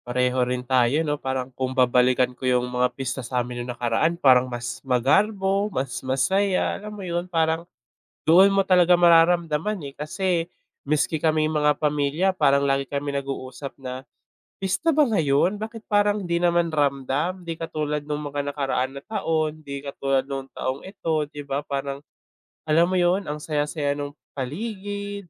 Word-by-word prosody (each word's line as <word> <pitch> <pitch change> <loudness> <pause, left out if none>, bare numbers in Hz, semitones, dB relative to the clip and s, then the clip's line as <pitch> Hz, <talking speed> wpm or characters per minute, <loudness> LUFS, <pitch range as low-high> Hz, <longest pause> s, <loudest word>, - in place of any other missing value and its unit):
Pareho 125 +1 +1
rin 125 0 -2
tayo 130 +4 +2
'no, 145 -1 -2
parang 130 -1 -3
kung 130 +1 -3
babalikan 125 0 +3
ko - - -29
yung 125 -1 +2
mga 125 0 +2
pista 130 -1 -3
sa'min 125 0 -3
yung 120 - -7
nakaraan 125 +8 +1
parang 130 -5 +5
mas 120 -1 -5
magarbo, 195 - +2
mas 135 -8 -3
masaya 185 +10 +1
alam 210 - -7
mo 195 - -7
yun? 175 +1 -3
Parang 165 0 0 0.5
doon 175 +5 +7
mo 195 - +4
talaga 180 -2 +5
mararamdaman, 170 +1 +3
eh, 140 -1 -8
kasi 170 +2 -1 0.4
miski 155 +2 +1
kaming 155 0 +1
mga 150 -1 +2
pamilya 150 +4 0
parang 140 -7 +3
lagi 135 0 +1
kami 145 +1 -3
nag-uusap 135 0 -6
na, 130 +1 -6 0.5
"Pista 280 - 0
ba 305 - +6
ngayon, 165 +3 +2
bakit 225 0 -7
parang 205 -1 +1
di 170 -1 0
naman 170 -1 +2
ramdam?" 145 +5 -1
Di 165 -1 -6
katulad 150 -2 -2
nung 150 0 -3
mga 145 0 -3
nakaraan 135 -2 -2
na 140 - -8
taon, 160 -7 -1
di 140 -2 -7
katulad 135 -1 -1
nung 135 -1 -5
taong 130 +2 -2
ito 160 -6 -2
di 145 -1 -8
ba. 140 0 -2
Parang 140 -1 -4 0.7
alam 165 +3 +3
mo 185 - +1
yun, 180 0 +1
ang 150 - -3
saya-saya 150 -1 -1
ng 145 0 -4 0.2
paligid, 200 - -5
150 Hz, 160 wpm, -24 LUFS, 135-175 Hz, 0.7 s, doon